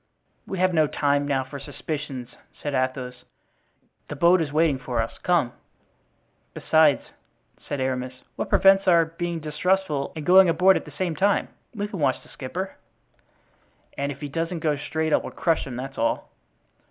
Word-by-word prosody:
"We 190 - -4
have 185 0 +2
no 155 -2 +4
time 145 0 +1
now 135 -2 +1
for 140 +2 -9
suspicions," 140 -3 -6 0.3
said 145 - -4
Athos. 130 -1 -2 0.8
"The 150 - -6
boat 170 +4 +4
is 150 -3 -2
waiting 155 -3 +2
for 125 -2 -3
us; 115 - -3
come." 160 -9 +1 1.0
"Besides," 155 -3 +3 0.5
said 145 - -5
Aramis, 130 -1 -3
"what - - -4
prevents 195 0 +5
our 170 -2 +6
being 170 +1 -4
distrustful 155 -1 0
and 155 -2 -6
going 185 +1 +7
aboard 185 +3 +5
at - - -2
the - - -11
same 180 -4 -1
time? 200 +5 +2 0.3
We 205 -1 -2
can 200 -3 -7
watch 135 -3 +1
the - - -19
skipper." 180 +9 -6 1.2
"And 140 +1 -2
if 140 - -10
he 145 - -3
doesn't 165 +3 -3
go 155 -2 +1
straight 155 +2 -2
I - - +6
will - - -5
crush 165 -4 0
him, 125 - -6
that's 135 +2 -6
all." 115 - -1
150 Hz, 170 wpm, -24 LUFS, 135-175 Hz, 1.2 s, going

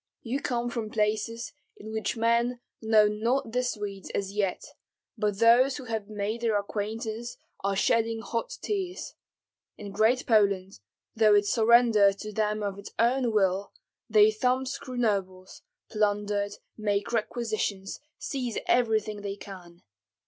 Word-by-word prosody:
You 255 +4 -2
come 240 -2 -1
from 230 -3 -3
places 220 +2 -1 0.2
in 215 +1 -9
which 220 +1 -2
men 235 +2 +1 0.2
know 220 -1 +5
not 230 +4 -1
the 250 +2 +1
Swedes 205 -6 -4
as 195 -1 -2
yet, 200 -3 -1 0.5
but 210 -3 -1
those 240 +4 +5
who 275 - -8
have 220 -3 -4
made 210 +2 -3
their 225 -3 +2
acquaintance 220 +3 -4 0.3
are 195 0 0
shedding 225 +2 +1
hot 230 0 -3
tears. 380 -3 -3 0.6
In 205 -1 -8
Great 220 +5 +2
Poland, 200 - +2 0.4
though 215 -2 +5
it 205 0 +4
surrendered 220 -3 +5
to 215 +1 -7
them 210 0 0
of 200 -1 -3
its 200 - -9
own 245 +1 +2
will, 195 -2 +1 0.4
they 215 0 +6
thumbscrew 255 +3 -1
nobles, 190 -5 -2 0.3
plunder, 205 -1 0 0.3
make 205 -1 -1
requisitions, 215 -4 -2 0.2
seize 250 -5 -3
everything 220 -3 +1
they 200 -1 -4
can. 180 -4 -12
215 Hz, 135 wpm, -28 LUFS, 205-235 Hz, 0.6 s, they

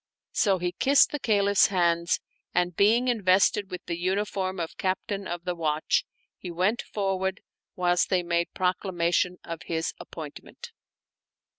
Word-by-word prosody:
So 195 -3 +2
he 180 0 -2
kissed 275 +8 +4
the 295 - -3
Caliph's 200 -4 +3
hands, 170 -3 +1 0.4
and, 180 -1 +1
being 225 +7 +4
invested 200 -2 +3
with 180 -2 -7
the 170 -1 -4
uniform 190 0 -1
of 165 -1 -4
Captain 195 +1 -2
of 175 0 -5
the 180 - -2
Watch, 155 -2 0 0.3
he 180 - -7
went 185 +7 0
forth, 190 -2 -2 0.4
whilst 175 -1 +2
they 185 -2 +2
made 170 0 0
proclamation 180 -1 0
of 165 -1 -6
his 165 0 -2
appointment. 485 -1 -10
185 Hz, 140 wpm, -27 LUFS, 175-200 Hz, 0.4 s, kissed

